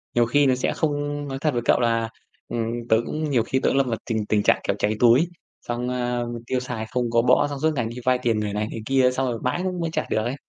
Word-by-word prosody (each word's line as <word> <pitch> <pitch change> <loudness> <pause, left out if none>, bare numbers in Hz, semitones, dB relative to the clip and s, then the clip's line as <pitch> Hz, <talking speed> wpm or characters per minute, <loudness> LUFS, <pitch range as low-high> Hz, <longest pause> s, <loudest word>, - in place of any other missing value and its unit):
nhiều 120 -1 +4
khi 145 +4 +3
nó 130 - +4
sẽ 125 - -1
không 145 -1 -2
nói 135 - -4
thật 150 -3 +1
với 120 - 0
cậu - - +4
là, 115 -2 +1 0.4
ừm, 115 -1 -2 0.2
tớ 110 - +5
cũng 155 0 -3
nhiều 120 -4 +3
khi 130 +3 0
tớ - - +2
cũng 135 - +1
lâm 135 - +3
vào 115 - -1
tình 110 -2 0
tình 105 -1 +2
trạng, - - +4
kiểu, - - +1
cháy 105 +1 +1
túi, 125 +7 +5 0.4
xong, 120 +1 -2
ờ, 120 -1 -1 0.2
tiêu 130 - 0
xài 125 -3 -5
không 125 -2 -1
có 115 0 +4
bõ 135 +4 +4
xong 140 -1 -5
suốt 160 - +3
ngày 120 -4 0
đi 120 - -8
vay 130 0 +4
tiền 115 -3 +1
người 105 -1 -2
này, 105 +1 -1
người 115 - -5
kia 130 0 +3
xong 130 +1 -1
rồi 115 - -4
mãi 125 +7 0
cũng 185 -1 -2
mới 165 - -1
trả - - -1
được 110 - +1
ấy. 125 +3 -2
125 Hz, 285 wpm, -24 LUFS, 115-135 Hz, 0.4 s, tớ